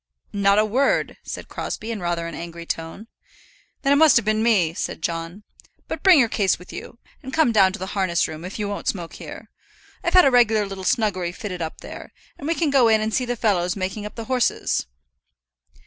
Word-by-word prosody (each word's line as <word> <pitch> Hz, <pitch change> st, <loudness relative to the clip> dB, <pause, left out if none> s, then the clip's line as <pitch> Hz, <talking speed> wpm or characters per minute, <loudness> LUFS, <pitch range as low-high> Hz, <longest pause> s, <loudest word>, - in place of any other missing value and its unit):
"Not 200 Hz, 0 st, +3 dB
a 215 Hz, -, +4 dB
word," 255 Hz, +6 st, +1 dB
said -, -, -7 dB
Crosbie, 220 Hz, +2 st, -5 dB
in 220 Hz, -, -4 dB
rather 175 Hz, -2 st, -2 dB
an 170 Hz, -, -6 dB
angry 170 Hz, 0 st, -7 dB
tone. 165 Hz, +6 st, -5 dB, 0.8 s
"Then 275 Hz, 0 st, +4 dB
it -, -, +4 dB
must 315 Hz, -2 st, +6 dB
have 235 Hz, -, +3 dB
been 215 Hz, 0 st, +1 dB
me," 200 Hz, -8 st, +3 dB
said 165 Hz, -, -5 dB
John. 170 Hz, +4 st, -4 dB, 0.4 s
"But -, -, -5 dB
bring 375 Hz, -4 st, +7 dB
your 250 Hz, -4 st, +5 dB
case 200 Hz, -4 st, +1 dB
with 180 Hz, -, -13 dB
you, -, -, -9 dB, 0.2 s
and 265 Hz, -, -8 dB
come 310 Hz, -3 st, +3 dB
down 195 Hz, -4 st, +5 dB
to -, -, -5 dB
the 190 Hz, -, -5 dB
harness 185 Hz, -4 st, +1 dB
room, 155 Hz, +1 st, -8 dB
if 185 Hz, +2 st, -7 dB
you 210 Hz, -2 st, -2 dB
won't 205 Hz, 0 st, -5 dB
smoke 175 Hz, -4 st, -2 dB
here. -, -, -10 dB, 0.5 s
I've -, -, 0 dB
had 365 Hz, -, +8 dB
a 270 Hz, -, +5 dB
regular 225 Hz, -4 st, +4 dB
little 195 Hz, -1 st, -7 dB
snuggery 185 Hz, -7 st, 0 dB
fitted 180 Hz, -2 st, -6 dB
up 160 Hz, -1 st, -5 dB
there; -, -, -10 dB, 0.3 s
and 285 Hz, -, -6 dB
we 330 Hz, -, +1 dB
can 320 Hz, -4 st, 0 dB
go 265 Hz, -4 st, +5 dB
in 220 Hz, -1 st, +4 dB
and 215 Hz, 0 st, -2 dB
see 255 Hz, -, +1 dB
the 245 Hz, 0 st, -2 dB
fellows 180 Hz, -6 st, +1 dB
making 195 Hz, +2 st, -4 dB
up -, -, -13 dB
the 230 Hz, -, -6 dB
horses." 250 Hz, -, 0 dB
210 Hz, 220 wpm, -23 LUFS, 180-235 Hz, 0.8 s, had